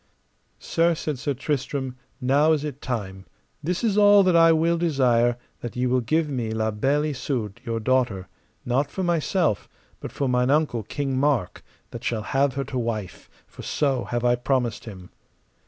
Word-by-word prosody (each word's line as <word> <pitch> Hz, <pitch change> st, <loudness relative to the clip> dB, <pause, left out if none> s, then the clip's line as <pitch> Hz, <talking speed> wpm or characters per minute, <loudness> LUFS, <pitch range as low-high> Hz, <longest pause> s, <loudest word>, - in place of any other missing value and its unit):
Sir, 170 Hz, 0 st, +1 dB
said 150 Hz, -4 st, -4 dB
Sir 140 Hz, +1 st, -2 dB
Tristram, 135 Hz, -1 st, -3 dB, 0.2 s
now 145 Hz, +5 st, +3 dB
is 150 Hz, -2 st, -1 dB
it 145 Hz, -2 st, -6 dB
time; 95 Hz, -7 st, -5 dB, 0.3 s
this 175 Hz, +7 st, -2 dB
is 210 Hz, -3 st, +2 dB
all 205 Hz, -1 st, +7 dB
that 185 Hz, -2 st, +3 dB
I 165 Hz, 0 st, +7 dB
will 165 Hz, +1 st, +2 dB
desire, 125 Hz, -7 st, +2 dB, 0.2 s
that 120 Hz, -, -7 dB
ye 125 Hz, +1 st, 0 dB
will 125 Hz, 0 st, +2 dB
give 155 Hz, +7 st, +1 dB
me 125 Hz, -6 st, -3 dB
La 110 Hz, 0 st, -1 dB
Beale 135 Hz, +8 st, +1 dB
Isoud, 125 Hz, -6 st, -3 dB
your 115 Hz, -1 st, -2 dB
daughter, 115 Hz, -6 st, 0 dB, 0.4 s
not 135 Hz, +4 st, +1 dB
for 190 Hz, -, -4 dB
myself, 170 Hz, -, 0 dB, 0.3 s
but -, -, -7 dB
for 140 Hz, -, -2 dB
mine 125 Hz, 0 st, +1 dB
uncle, 145 Hz, -5 st, +2 dB
King 135 Hz, +4 st, -3 dB
Mark, 135 Hz, -10 st, 0 dB, 0.3 s
that 120 Hz, -, -8 dB
shall 115 Hz, -3 st, -2 dB
have 135 Hz, +2 st, +1 dB
her 140 Hz, -, -1 dB
to 130 Hz, -1 st, -4 dB
wife, 110 Hz, -6 st, -4 dB, 0.2 s
for -, -, -12 dB
so 135 Hz, -4 st, 0 dB
have 120 Hz, 0 st, -2 dB
I 120 Hz, -, +4 dB
promised 125 Hz, -2 st, -1 dB
him. 95 Hz, -5 st, -10 dB
130 Hz, 175 wpm, -24 LUFS, 120-150 Hz, 0.4 s, all